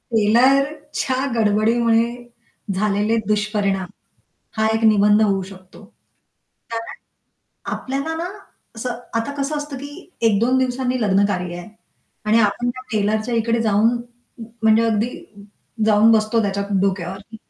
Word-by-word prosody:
टेलरच्या 265 +4 +2
गडबडीमुळे 225 +2 +2 0.7
झालेले 210 +3 +1
दुष्परिणाम 205 -3 0 0.7
हा 220 0 +2
एक 225 - -2
निबंध 210 0 +5
होऊ 195 -2 +1
शकतो. 185 +1 -14 0.9
कारण 230 0 -5 0.8
आपल्याला 275 +5 -3
ना, 340 +2 -3 0.5
असं 240 +1 -4 0.2
आता 230 +5 -3
कसं 300 +2 -2
असतं 290 -1 -5
की 285 - -7 0.4
एक 205 - +2
दोन 255 +3 +2
दिवसांनी 255 0 -1
लग्नकार्य 190 -3 +1
आहे. 175 - -9 0.6
आणि 215 +2 +4
आपण 215 +3 +1
त्या 255 +1 -9
टेलरच्या 215 +3 0
इकडे 230 +1 +1
जाऊन 220 +2 +3 0.7
म्हणजे 220 0 +5
अगदी 225 0 +1 0.8
जाऊन 215 +1 +5
बसतो 220 +1 +2
त्याच्या 200 -1 -1 0.2
डोक्यावरती. 195 +2 -3
220 Hz, 115 wpm, -20 LUFS, 205-245 Hz, 0.9 s, निबंध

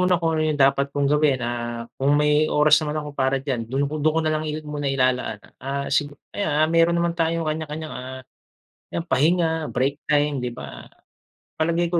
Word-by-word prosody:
muna 180 0 +3
kung 165 -1 0
ano 160 - 0
yung 155 - 0
dapat 140 0 +3
kong 140 0 0
gawin. 145 -4 +2
Ah, 120 -1 -3 0.2
kung 140 +2 +3
may 150 +1 +3
oras 150 +1 +5
naman 150 0 -3
ako 150 -1 -4
para 135 -1 +1
diyan, 130 -4 -3
do'n 135 +3 0
ko 150 +2 -3
do'n 155 +1 +2
ko - - +3
na 155 - +1
lang 155 0 -2
i 155 0 -4
muna 145 -1 -3
ilalaan. 130 -4 +1 0.2
Ah, 140 +2 -3
sigu 145 0 0 0.2
ayan, 200 - -2
ah, 155 - +4
meron 165 +1 +3
naman 170 0 +1
tayong 165 -1 0
kanya-kanyang, 155 0 -4
ah, 130 +1 -7 0.8
yan 170 - -1
pahinga, 160 +1 +1
break 135 +3 -1
time, 145 -1 +2
'di 125 -1 -4
ba? 65 - -9 0.7
Palagay 170 +1 +1
ko, 175 - +2
150 Hz, 205 wpm, -23 LUFS, 135-160 Hz, 0.8 s, oras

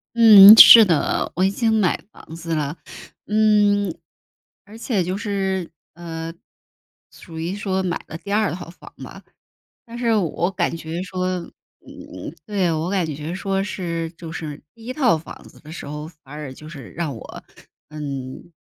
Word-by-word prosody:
嗯， 215 -2 +10
是 230 0 +11
的， 165 -7 0
我 185 - +2
已 190 - +2
经 225 +2 0
买 210 -5 +1
房 160 - -14
子 165 0 -5
了。 150 0 -3 0.5
嗯， 205 -3 +2 0.7
而 210 +2 -14
且 215 -6 -1
就 185 +2 -3
是， 190 -4 -3 0.3
呃， 165 -1 -7 0.8
属 165 -2 -12
于 170 +4 -4
说 190 -2 -2
买 180 -2 -3
了 160 - -7
第 200 +4 -8
2 210 0 +1
套 175 -1 -8
房 175 - -15
吧。 - - -12 0.6
但 235 0 -10
是 235 -2 0
我 175 -2 -1
感 175 -3 -2
觉 165 +1 -6
说， 185 0 -4 0.5
嗯， 95 - -11
对， 195 -5 -1
我 160 +2 -3
感 190 -3 0
觉 155 +1 -6
说 195 +1 -2
是， 170 -4 -4
就 165 -1 -11
是 155 -2 -7
第 225 -1 -16
1 250 - -5
套 255 - +2
房 160 - -12
子 - - -18
的 155 - -13
时 165 - -8
候， 150 +1 -7
反而 150 -3 -10
就 155 +3 -13
是 145 -7 -11
让 160 -6 -4
我， 110 - -11 0.4
嗯， 140 0 -8
175 Hz, 175 characters per minute, -21 LUFS, 160-200 Hz, 0.8 s, 是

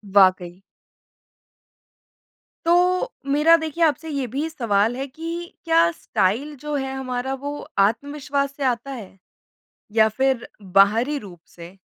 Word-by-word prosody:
वाक़ई। 185 -2 +4 2.0
तो 360 +6 +3 0.2
मेरा 300 +4 +5
देखिए 320 +1 -2
आपसे 320 +1 +1
ये 280 -3 -2
भी 285 +7 -3
सवाल 225 -5 +1
है 270 - -3
कि 320 +5 -9 0.4
क्या 330 +1 +4
स्टाइल 275 - -1
जो 300 0 -4
है 270 -1 -2
हमारा 260 0 -3
वो 285 +2 -5 0.2
आत्मविश्वास 280 +6 0
से 285 - -4
आता 255 +1 -1
है? 215 -7 -9 0.8
या 220 0 +5
फिर 265 +2 0 0.2
बाहरी 210 +9 +3
रूप 185 -7 -12
से? 170 +2 -13
265 Hz, 125 wpm, -22 LUFS, 215-300 Hz, 2.0 s, मेरा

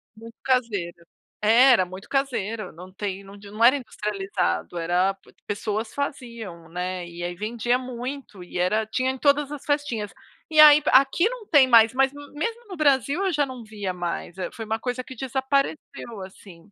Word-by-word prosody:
Muito 230 +1 -13
caseiro, 205 -10 -1 0.4
é 235 +5 +6
era 220 -7 +4
muito 185 +2 -11
caseiro, 230 -6 -2
não 180 +3 -12
tem 195 0 -5
onde 200 0 -12
não 215 +2 -1
era 250 +4 +7
industrializado, 210 -8 -3
era 180 +3 +1 0.3
pessoas 215 +2 -3
faziam, 235 - -6
né, 180 +1 -4
e 170 0 -9
aí 175 0 -3
vendia 230 +5 -1
muito 255 -3 -7
e 175 - -8
era 210 +5 +1
tinha 255 +4 -1
em 265 - -7
todas 285 +1 +2
as 295 -2 -7
festinhas, 270 -8 -1 0.4
e 315 - -3
aí 300 -1 +10
aqui 275 +8 +4
não 485 -2 -6
tem 285 -5 +6
mais, 230 -2 +6
mas 270 +1 +3 0.2
mesmo 460 +11 -4
no 370 - -7
Brasil 285 - +2
eu 375 - 0
já 290 -1 +2
não 255 -3 -9
via 205 -3 -4
mais, 175 0 -5
eh, 185 - -3
foi 225 - -6
uma 220 +1 -2
coisa 250 +2 -3
que 260 +2 -11
desapareceu 265 -2 -2
assim. 185 -1 -16
230 Hz, 175 wpm, -24 LUFS, 195-270 Hz, 0.4 s, aí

